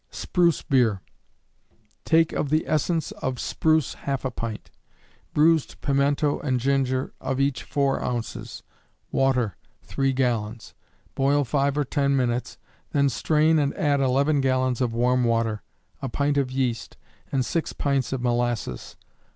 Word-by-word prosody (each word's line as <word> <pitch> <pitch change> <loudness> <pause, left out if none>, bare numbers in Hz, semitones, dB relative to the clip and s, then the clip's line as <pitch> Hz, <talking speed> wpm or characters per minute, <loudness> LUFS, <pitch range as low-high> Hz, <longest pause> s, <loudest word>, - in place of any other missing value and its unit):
Spruce 170 -3 +1
Beer. 120 -7 +2 1.1
Take 165 0 +3
of 145 - -1
the 155 +2 +1
essence 155 +1 0
of 130 -1 -4
spruce 160 -1 +1
half 135 -1 -4
a 130 - -1
pint; 115 -2 -6 0.6
bruised 160 0 +3
pimento 140 +1 +1
and 130 -4 0
ginger, 130 0 0
of 135 0 -2
each 140 -1 +1
four 140 -1 0
ounces; 120 -2 -4 0.5
water, 125 -7 +1 0.3
three 135 +10 0
gallons. 120 -4 -2 0.4
Boil 140 +2 +2
five 140 +2 0
or 150 - +2
ten 140 0 +1
minutes, 125 -2 -1 0.4
then 140 -1 +3
strain 155 +7 +2
and 140 -1 0
add 145 -2 +1
11 140 +2 +2
gallons 130 -1 +1
of 125 -2 +1
warm 125 +1 +2
water, 115 -2 0 0.4
a 135 - -3
pint 140 +3 0
of 135 -2 0
yeast, 130 -3 -2 0.3
and 130 -3 +1
six 165 +7 -1
pints 140 -3 -1
of 130 -2 -3
molasses. 120 - -2
135 Hz, 140 wpm, -25 LUFS, 125-145 Hz, 1.1 s, Take